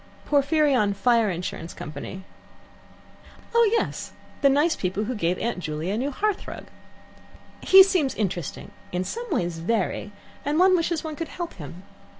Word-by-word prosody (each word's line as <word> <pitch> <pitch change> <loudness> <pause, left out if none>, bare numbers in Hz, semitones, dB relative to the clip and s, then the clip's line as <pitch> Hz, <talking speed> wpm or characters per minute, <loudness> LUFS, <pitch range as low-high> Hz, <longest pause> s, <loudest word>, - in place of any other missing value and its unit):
"Porphyrion 280 -7 +3
Fire 230 -1 +3
Insurance 175 -1 -5
Company." 155 +6 -7 1.3
"Oh 465 -2 +5
yes; 460 - -1 0.3
the 280 - +6
nice 295 +5 +3
people 190 +3 -2
who 240 +4 -2
gave 180 -5 0
Aunt 235 -5 -2
Juley 155 +2 -3
a 210 - -1
new 270 +3 -1
hearth 410 +8 -1
rug. - - -7 1.0
He 385 0 +9
seems 360 -8 +1
interesting, 180 -7 -3 0.2
in 180 +1 -1
some 475 - -5
ways 170 - -1
very, 205 +2 -1 0.3
and 295 +2 0
one 370 +1 +6
wishes 335 -2 0
one 315 -1 -5
could 330 +2 -4
help 345 -1 -5
him. 170 +2 -10
240 Hz, 155 wpm, -25 LUFS, -, 1.3 s, He